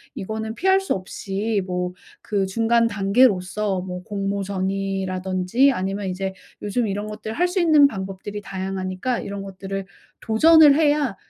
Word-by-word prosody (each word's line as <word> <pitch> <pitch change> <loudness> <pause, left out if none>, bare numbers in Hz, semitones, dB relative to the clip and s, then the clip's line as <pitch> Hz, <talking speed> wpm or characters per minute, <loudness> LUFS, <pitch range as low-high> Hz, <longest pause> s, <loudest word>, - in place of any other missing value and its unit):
이거는 220 +3 -4
피할 380 +5 +3
수 385 - -1
없이 195 +2 -3
뭐 180 0 -2 0.3
그 200 -2 -1
중간 230 +3 +2
단계로서 200 -2 +2
뭐 180 -1 -6
공모전이라든지 195 +2 0
아니면 195 0 -3
이제 190 +1 -3 0.3
요즘 220 +2 0
이런 205 +1 -3
것들을 215 +1 -6
할 355 - +3
수 365 +1 -1
있는 305 -4 +6
방법들이 195 -1 -6
다양하니까 190 +4 -3
이런 200 0 -6
것들을 195 0 -6 0.4
도전을 300 +6 +6
해야 295 -7 +2
200 Hz, 315 characters per minute, -22 LUFS, 190-230 Hz, 0.4 s, 있는